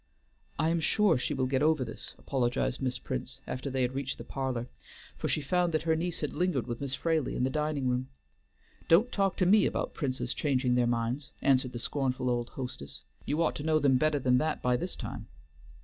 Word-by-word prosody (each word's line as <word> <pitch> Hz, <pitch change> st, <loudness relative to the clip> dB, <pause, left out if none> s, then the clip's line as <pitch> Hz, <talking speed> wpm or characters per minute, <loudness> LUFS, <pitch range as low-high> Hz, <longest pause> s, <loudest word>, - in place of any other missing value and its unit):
"I 160 Hz, -, +2 dB
am 170 Hz, 0 st, +2 dB
sure 200 Hz, +2 st, +3 dB
she -, -, -1 dB
will 130 Hz, -, +1 dB
get 130 Hz, +1 st, +1 dB
over 155 Hz, -3 st, +3 dB
this," 115 Hz, -, -8 dB
apologized 125 Hz, -1 st, -1 dB
Miss 130 Hz, -1 st, -1 dB
Prince, -, -, -5 dB
after 130 Hz, +2 st, -4 dB
they 130 Hz, -1 st, 0 dB
had 125 Hz, +1 st, 0 dB
reached 135 Hz, 0 st, -3 dB
the -, -, -7 dB
parlor, 130 Hz, -3 st, -3 dB, 0.5 s
for -, -, -3 dB
she 155 Hz, -, 0 dB
found 175 Hz, +3 st, +1 dB
that 155 Hz, -, 0 dB
her 160 Hz, -1 st, +2 dB
niece 170 Hz, +1 st, -2 dB
had 150 Hz, -, -2 dB
lingered 175 Hz, -7 st, 0 dB
with 120 Hz, +1 st, -5 dB
Miss 140 Hz, -1 st, -2 dB
Fraley 160 Hz, -2 st, 0 dB
in -, -, 0 dB
the 130 Hz, -, +1 dB
dining 150 Hz, -3 st, 0 dB
room. 125 Hz, +1 st, 0 dB, 0.8 s
"Don't 205 Hz, +10 st, +5 dB
talk 195 Hz, -2 st, +1 dB
to 185 Hz, -, +3 dB
me 205 Hz, +4 st, +6 dB
about -, -, -2 dB
the -, -, -24 dB
Princes 135 Hz, -4 st, -1 dB
changing 130 Hz, -4 st, +1 dB
their 125 Hz, -1 st, +3 dB
minds," 120 Hz, +4 st, -1 dB
answered 130 Hz, -2 st, +3 dB
the -, -, -4 dB
scornful 130 Hz, 0 st, -1 dB
old 120 Hz, -1 st, -1 dB
hostess. 70 Hz, -, -7 dB, 0.2 s
"You 150 Hz, +4 st, +1 dB
ought 160 Hz, -, +1 dB
to 145 Hz, -, -5 dB
know 155 Hz, 0 st, +3 dB
them 140 Hz, -3 st, +4 dB
better 155 Hz, 0 st, +2 dB
than 125 Hz, -2 st, +3 dB
that 155 Hz, +2 st, 0 dB
by 125 Hz, 0 st, +3 dB
this -, -, -3 dB
time." -, -, -6 dB
135 Hz, 220 wpm, -30 LUFS, 125-155 Hz, 0.8 s, me